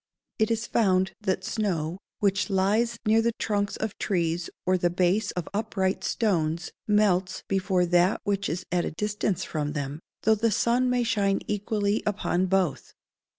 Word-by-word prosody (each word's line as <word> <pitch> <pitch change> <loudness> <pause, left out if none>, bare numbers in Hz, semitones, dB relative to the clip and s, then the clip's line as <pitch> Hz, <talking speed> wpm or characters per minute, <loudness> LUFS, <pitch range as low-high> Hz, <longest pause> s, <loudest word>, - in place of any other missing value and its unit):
It 220 - +3
is 230 0 0
found 190 -5 +2
that 190 -2 -1
snow, 185 -5 -2 0.2
which 200 +1 +1
lies 210 +5 +1
near 220 +1 +4
the 235 +1 +1
trunks 205 -2 -1
of 220 -2 -3
trees 170 -3 -1 0.2
or 185 - +3
the 175 -1 +2
base 185 +4 +1
of 180 -3 -4
upright 200 -3 -1
stones, 170 -6 0 0.2
melts 195 -3 +2
before 190 -2 +1
that 175 +2 +3
which 200 -2 -1
is 175 +4 -3
at 175 -1 +1
a - - -2
distance 205 +1 -2
from 150 -4 -3
them, 145 0 -4 0.2
though 220 - +5
the 225 +2 +1
sun 240 +4 +2
may 250 -1 +2
shine 205 -4 +1
equally 210 0 0
upon 190 -3 0
both. 185 -5 0
195 Hz, 160 wpm, -26 LUFS, 180-215 Hz, 0.2 s, though